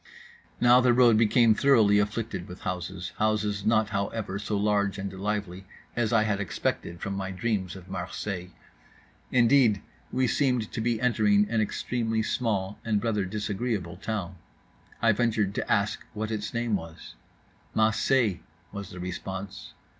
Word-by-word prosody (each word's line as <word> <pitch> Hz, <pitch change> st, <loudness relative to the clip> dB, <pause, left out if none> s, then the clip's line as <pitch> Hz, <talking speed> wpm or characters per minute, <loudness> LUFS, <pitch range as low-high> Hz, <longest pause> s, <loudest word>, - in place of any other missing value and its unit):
Now 120 Hz, +1 st, +6 dB
the 125 Hz, -1 st, +4 dB
road 120 Hz, -3 st, +6 dB
became 115 Hz, +1 st, +5 dB
thoroughly 110 Hz, -5 st, +4 dB
afflicted 105 Hz, -3 st, -2 dB
with 90 Hz, -, -10 dB
houses, 90 Hz, -1 st, -4 dB
houses 105 Hz, -2 st, 0 dB
not, 110 Hz, -1 st, +3 dB
however, 100 Hz, -1 st, -3 dB
so 105 Hz, 0 st, -2 dB
large 100 Hz, -1 st, +1 dB
and 100 Hz, -1 st, -5 dB
lively 95 Hz, -1 st, -3 dB, 0.3 s
as 115 Hz, -3 st, 0 dB
I 115 Hz, -2 st, +4 dB
had 105 Hz, -2 st, 0 dB
expected 85 Hz, -3 st, -3 dB
from 100 Hz, -, -3 dB
my 95 Hz, -1 st, -3 dB
dreams 95 Hz, -2 st, -2 dB
of 95 Hz, -1 st, -11 dB
Marseilles. 90 Hz, 0 st, -5 dB, 0.8 s
Indeed 120 Hz, -3 st, +4 dB, 0.3 s
we 130 Hz, +1 st, +1 dB
seemed 125 Hz, -4 st, +1 dB
to -, -, -3 dB
be 115 Hz, 0 st, 0 dB
entering 105 Hz, -4 st, +3 dB
an 115 Hz, -1 st, +2 dB
extremely 115 Hz, +1 st, -1 dB
small 105 Hz, -4 st, -1 dB
and 105 Hz, -2 st, 0 dB
rather 105 Hz, -4 st, 0 dB
disagreeable 105 Hz, -2 st, -3 dB
town. 100 Hz, -3 st, -4 dB, 0.7 s
I 115 Hz, -, +6 dB
ventured 110 Hz, -3 st, +1 dB
to -, -, -3 dB
ask -, -, +1 dB
what 110 Hz, +1 st, -3 dB
its 105 Hz, -1 st, -3 dB
name 115 Hz, -2 st, 0 dB
was. 80 Hz, -7 st, -8 dB, 0.6 s
"Mah 110 Hz, 0 st, +4 dB
say" 110 Hz, -5 st, +2 dB, 0.3 s
was 100 Hz, -2 st, -6 dB
the 90 Hz, -, -9 dB
response. 90 Hz, -1 st, -6 dB
105 Hz, 150 wpm, -27 LUFS, 95-115 Hz, 0.8 s, Now